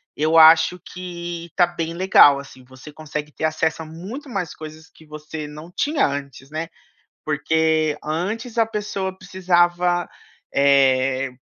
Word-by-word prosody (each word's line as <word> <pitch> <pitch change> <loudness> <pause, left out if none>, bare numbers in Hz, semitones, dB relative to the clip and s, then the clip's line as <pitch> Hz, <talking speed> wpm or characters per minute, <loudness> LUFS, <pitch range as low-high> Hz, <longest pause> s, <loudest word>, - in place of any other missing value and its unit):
eu 155 +2 +2
acho 160 +2 +7
que 175 -2 -7
tá 180 - +5
bem 165 -1 -5
legal, 170 -5 +6
assim, 135 -2 -12
você 130 +4 -13
consegue 150 0 -6
ter 155 - -3
acesso 160 +1 -1
a 160 - -7
muito 195 - -9
mais 190 -9 -4
coisas 155 0 -11
que 160 - -20
você 150 0 -8
não 150 +4 -11
tinha 295 - +1
antes, 140 -1 -5
né. 160 +1 -4 0.6
Porque 155 0 +1
antes 215 +10 -4
a 225 - +4
pessoa 200 -3 -4
precisava, 175 -1 +1 0.4
eh, 135 -1 +3
160 Hz, 140 wpm, -21 LUFS, 150-180 Hz, 0.6 s, acho